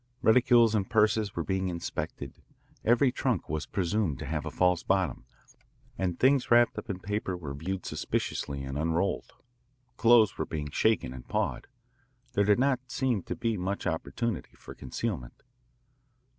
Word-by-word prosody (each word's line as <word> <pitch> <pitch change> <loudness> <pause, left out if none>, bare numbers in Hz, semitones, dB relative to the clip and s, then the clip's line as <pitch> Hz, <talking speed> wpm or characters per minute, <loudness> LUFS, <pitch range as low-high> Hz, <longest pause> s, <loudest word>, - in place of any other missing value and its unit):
Reticules 120 -1 +5
and 100 -3 0
purses 105 -2 +2
were 85 - -1
being 95 +1 -1
inspected. 85 -1 -5 0.4
Every 125 +3 +4
trunk 125 - -1
was 75 0 -3
presumed 95 -4 0
to 80 - -6
have 80 +2 -3
a - - -1
false 90 +1 +2
bottom, 95 -4 0 0.7
and 90 -2 -2
things 135 0 +3
wrapped 120 0 +5
up - - -11
in 95 - -2
paper 100 -2 -2
were 75 -6 -6
viewed 90 +6 -4
suspiciously 70 -1 -3
and 65 +1 -4
unrolled. 85 +5 -1 0.6
Clothes 115 -3 +5
were - - 0
being 75 -2 -4
shaken 65 - +1
and 65 -1 -10
pawed. - - -2 0.7
There 100 -2 +2
did 105 0 +4
not 130 0 +2
seem 125 -6 0
to - - -5
be 115 -2 -1
much 95 +2 -3
opportunity 100 +6 -3
for - - -11
concealment. 70 - -5
95 Hz, 155 wpm, -29 LUFS, 80-115 Hz, 0.7 s, Reticules